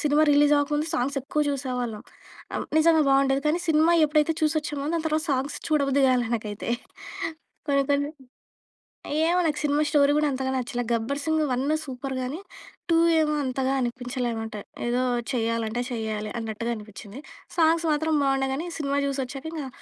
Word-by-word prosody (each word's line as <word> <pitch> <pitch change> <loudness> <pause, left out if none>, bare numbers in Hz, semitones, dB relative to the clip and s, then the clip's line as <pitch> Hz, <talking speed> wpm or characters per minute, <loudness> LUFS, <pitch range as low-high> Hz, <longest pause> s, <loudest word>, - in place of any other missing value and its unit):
Cinema 300 +1 +3
release 290 0 +5
అవ్వక 290 0 +1
ముందు 300 +2 0
songs 280 -1 -1
ఎక్కువ 290 +3 -2
చూసేవాళ్ళం. 250 -5 -3 0.5
ఆహ్, - - -2
నిజంగా 320 -1 +5
బాగుండేది. 270 0 +3
కానీ 320 +3 +2
సినిమా 320 +2 +4
ఎప్పుడైతే 300 +1 +2
చూసొచ్చామో, 300 -2 0
దాని 330 -1 -1
తర్వాత 310 0 +1
సాంగ్స్ 270 +2 -1
చూడబుద్ది 280 -2 +2
కాలే 250 -2 +2
నాకైతే. 210 -1 -5 1.0
కొన్ని, 280 -1 +3
కొన్ని 285 +1 +1 1.2
ఏమో 350 +2 +2
నాకు 300 -1 0
సినిమా 295 0 +2
స్టోరీ 290 -1 +4
కూడా 300 -1 +2
అంతగా 265 0 -2
నచ్చల. 245 -1 -2
'గబ్బర్ 235 +5 -1
సింగ్ 315 -1 +1
1' 280 +5 +1
సూపర్ 265 0 -5
గాని. 280 +8 -4 0.5
టూ 330 - +5 0.2
ఏమో 300 -1 +1
అంతగా 260 +1 -1
అనిపించలే 245 0 -2
అనమాట. 225 -1 -5 0.3
ఏదో 245 +1 +1 0.3
చేయాలంటే 230 -1 -1
చేయాలి 215 -2 -3
అన్నట్టుగా 225 +1 -3
అనిపించింది. 215 +2 -10 0.4
సాంగ్స్ 325 +1 +4
మాత్రం 315 +1 +1
బాగుండే 270 0 +1
గాని, 330 +5 -4
సినిమా 280 -1 0
చూసి 275 0 -2
వచ్చాక 270 +4 -8
ఇంకా 285 -4 -4
275 Hz, 155 wpm, -25 LUFS, 245-300 Hz, 1.2 s, release